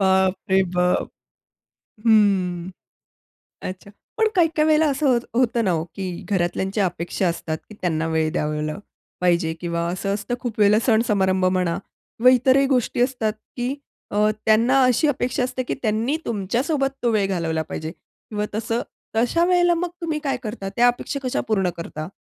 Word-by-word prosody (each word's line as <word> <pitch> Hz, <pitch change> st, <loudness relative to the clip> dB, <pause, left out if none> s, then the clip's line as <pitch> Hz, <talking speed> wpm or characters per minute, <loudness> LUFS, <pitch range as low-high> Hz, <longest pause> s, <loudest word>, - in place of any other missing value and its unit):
बापरे 190 Hz, 0 st, +2 dB
बाप! 180 Hz, 0 st, +1 dB, 1.0 s
हं. 190 Hz, -5 st, +3 dB, 1.0 s
अच्छा. 185 Hz, +2 st, -9 dB, 0.3 s
पण 440 Hz, -1 st, +4 dB
काही, 340 Hz, -3 st, +4 dB
काही 305 Hz, 0 st, +3 dB
वेळेला 310 Hz, 0 st, +4 dB
असं 280 Hz, +1 st, 0 dB
होत 245 Hz, -3 st, +4 dB
होतं 240 Hz, -2 st, +2 dB
ना 190 Hz, -, +2 dB
हो, 160 Hz, -1 st, 0 dB
की 190 Hz, -2 st, -4 dB, 0.2 s
घरातल्यांच्या 190 Hz, +2 st, 0 dB
अपेक्षा 175 Hz, +1 st, -2 dB
असतात 160 Hz, -1 st, -3 dB
की 215 Hz, -, -11 dB
त्यांना 160 Hz, -3 st, 0 dB
वेळ 160 Hz, -1 st, +1 dB
द्यावला 150 Hz, -1 st, -2 dB, 0.5 s
पाहिजे 170 Hz, -2 st, +2 dB
किंवा 170 Hz, -1 st, -2 dB
असं 195 Hz, +3 st, -2 dB
असतं 210 Hz, +4 st, -3 dB
खूप 240 Hz, -4 st, -5 dB
वेळेला 210 Hz, 0 st, +5 dB
सण-समारंभ 200 Hz, -5 st, +2 dB
म्हणा 185 Hz, -2 st, +1 dB
किंवा 245 Hz, +5 st, 0 dB
इतरही 260 Hz, +2 st, +4 dB
गोष्टी 255 Hz, -3 st, 0 dB
असतात, 245 Hz, -4 st, 0 dB, 0.2 s
की 250 Hz, +3 st, -1 dB, 0.4 s
अ, 210 Hz, +1 st, +3 dB, 0.2 s
त्यांना 235 Hz, +5 st, +4 dB
अशी 255 Hz, +5 st, +3 dB
अपेक्षा 250 Hz, -2 st, 0 dB
असते 255 Hz, 0 st, -3 dB
की -, -, -3 dB
त्यांनी 225 Hz, +6 st, 0 dB
तुमच्या 220 Hz, +3 st, -1 dB
सोबत 285 Hz, -3 st, +1 dB
तो 240 Hz, -, +2 dB
वेळ 210 Hz, -3 st, +2 dB
घालवला 165 Hz, -4 st, -1 dB
पाहिजे 160 Hz, 0 st, -5 dB
किंवा 210 Hz, +5 st, -7 dB
तसं. 225 Hz, +2 st, -1 dB, 0.3 s
तर -, -, +1 dB
अशा 335 Hz, +8 st, +2 dB
वेळेला 350 Hz, -1 st, +4 dB
मग 350 Hz, +1 st, -1 dB
तुम्ही 320 Hz, -2 st, -1 dB
काय 275 Hz, -, 0 dB
करता? 215 Hz, -4 st, -5 dB
त्या 240 Hz, -, +5 dB
अपेक्षा 245 Hz, +3 st, -2 dB
कशा 255 Hz, -1 st, -1 dB
पूर्ण 190 Hz, -4 st, +1 dB
करता? 155 Hz, -1 st, -6 dB
210 Hz, 165 wpm, -22 LUFS, 180-250 Hz, 1.0 s, वेळेला